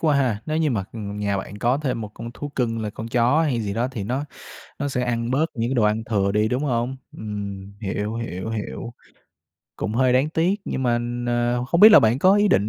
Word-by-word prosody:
quá 150 -3 +3
ha! 125 -7 +1
Nếu 155 - -1
như 160 -2 +2
mà, 105 -6 -1
ừm, 105 -2 -6
nhà 100 -1 0
bạn 100 +2 -7
có 125 +6 +2
thêm 130 -6 -2
một 105 -1 -6
con 115 0 -7
thú 145 - -5
cưng 115 -5 -1
là 105 - -3
con 110 +2 -7
chó 125 +6 +3
hay 130 -7 0
gì 100 -2 -3
đó 120 +3 0
thì 105 -6 -4
nó 130 +7 -2 0.5
nó 145 0 -1
sẽ 125 -2 -1
ăn 120 0 -1
bớt 150 +5 +2
những 115 -1 -1
cái 135 - 0
đồ 120 - +2
ăn 105 +1 +2
thừa 100 -2 +2
đi, 105 +1 +2
đúng 125 +6 -1
hông? 125 0 -1 0.2
Ừm, 100 -2 -6
hiểu, 105 +2 -3
hiểu, 110 -2 -4
hiểu. 115 +2 -5 0.8
Cũng 105 - -3
hơi 130 0 +3
đáng 130 +4 +3
tiếc 175 +6 +1
nhưng 130 - -3
mà 120 -2 +2
n 120 +1 -4 0.4
không 170 +5 +2
biết 215 +1 +10
là - - +10
bạn 115 +3 +3
có 185 +6 +5
ý 205 0 +4
định 100 - +3
120 Hz, 245 wpm, -23 LUFS, 105-135 Hz, 0.8 s, biết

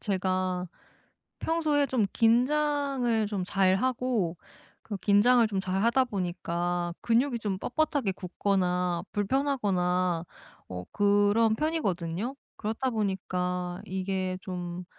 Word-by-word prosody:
제가 185 -2 -1 0.7
평소에 310 -3 +1
좀 245 -5 +1
긴장을 255 -1 +2
좀 200 -3 -2
잘 190 0 +3
하고 240 -7 0 0.5
그 210 - -5
긴장을 225 +5 +5
좀 195 -2 -1
잘 190 +1 -1
하다 235 +3 +4
보니까 175 -4 -2
근육이 240 +2 +2
좀 200 -4 -2
뻣뻣하게 285 -7 0
굳거나 180 -2 0
불편하거나 195 - +1 0.4
어 90 -1 -6
그런 205 +2 +3
편이거든요. 220 - -1 0.2
그렇다 225 +5 -2
보니까 180 -4 -2
이게 185 0 -2
좀 180 -1 -5
200 Hz, 230 characters per minute, -28 LUFS, 180-245 Hz, 0.7 s, 긴장을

